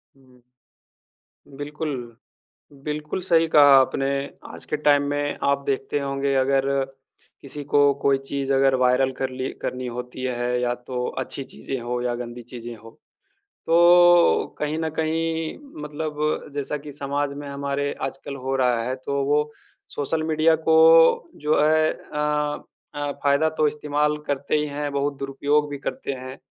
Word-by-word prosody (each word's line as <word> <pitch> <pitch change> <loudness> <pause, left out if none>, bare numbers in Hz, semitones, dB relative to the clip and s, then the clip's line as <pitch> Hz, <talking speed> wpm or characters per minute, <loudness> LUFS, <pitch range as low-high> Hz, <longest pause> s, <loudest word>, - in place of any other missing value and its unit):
हुँ, 135 -1 -24
हुँ। 125 -1 -23 1.1
बिल्कुल। 145 +2 -5 0.9
बिल्कुल 150 +3 -3
सही 165 -2 +3
कहा 150 -2 +6 0.2
आपने। 135 +1 +1 0.4
आज - - -9
के 150 - -2
टाइम 145 -1 +3
में 145 0 -2
आप 140 0 +1
देखते 140 +1 -1
होंगे, 140 0 -1
अगर 135 0 +2 0.8
किसी 145 +1 -8
को 145 0 +4
कोई 140 -1 +3
चीज़ 135 0 -3
अगर 135 0 +4
वायरल 130 +1 +3
करली 130 0 -3
करनी 125 0 -3
होती 125 +1 -6
है 125 0 -1
या 120 0 +1
तो 125 -1 -2
अच्छी 135 +1 -4
चीज़ें 135 0 -6
हों 120 +1 -3
या 120 -1 -1
गंदी 120 0 -7
चीज़ें 120 -1 -7
हों, 115 +1 -14 0.7
तो 175 +1 +5
कहीं 150 +1 -1
न 160 0 -1
कहीं 160 0 -1 0.3
मतलब 150 0 -3
जैसा 145 +1 -2
कि 145 0 -10
समाज 140 0 -2
में 145 0 -8
हमारे 140 0 -2
आजकल 135 +1 -5
हो 135 0 -3
रहा 125 -3 +2
है, 125 +2 -2
तो 140 +1 -2
वो 150 +1 +1 0.4
सोशल 155 +2 -2
मीडिया 160 +1 +3
को 165 +1 +6
जो 150 +1 +1
है 155 +1 +3
अ, 150 0 -2 0.3
अ, 145 0 -2
फ़ायदा 140 +2 +3
तो 155 - +3
इस्तेमाल 150 0 0
करते 140 +1 -1
ही 150 - 0
हैं, 145 0 -4
बहुत 140 0 -1
दुरुपयोग 145 +2 0
भी 145 - -5
करते 135 0 -4
हैं। 130 0 -8
140 Hz, 155 wpm, -23 LUFS, 135-150 Hz, 1.1 s, कहा